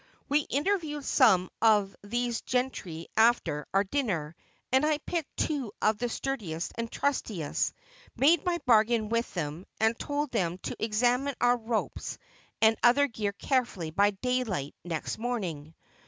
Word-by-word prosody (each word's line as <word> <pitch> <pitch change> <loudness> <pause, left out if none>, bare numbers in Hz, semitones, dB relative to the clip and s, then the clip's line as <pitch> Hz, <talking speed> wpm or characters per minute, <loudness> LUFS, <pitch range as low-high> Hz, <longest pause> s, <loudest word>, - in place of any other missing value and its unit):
We 290 +1 +3
interviewed 295 -2 -1
some 190 -9 +4
of 210 -3 +4
these 240 +3 -1
gentry 245 -11 -2
after 220 - +3
our 195 +1 +3
dinner, 190 - -2 0.4
and 260 +2 +4
I 305 0 +2
picked 315 +1 -4
two 275 -8 -1
of 215 -1 +2
the 245 0 -1
sturdiest 205 -12 -3
and 230 0 -4
trustiest, 215 - -1 0.4
made 310 +4 +4
my 355 -1 +1
bargain 220 -2 +4
with 230 +1 0
them, 160 +1 -4
and 220 +1 +3
told 290 -1 -2
them 180 -6 0
to - - -5
examine 245 +5 +1
our 245 0 +4
ropes 225 -1 -3 0.5
and 220 0 +6
other 250 +4 +5
gear 215 -5 -3
carefully 200 - -1
by 200 +5 +4
daylight 205 - -2
next 165 +2 -4
morning. 175 -11 -4
230 Hz, 140 wpm, -29 LUFS, 195-265 Hz, 0.5 s, and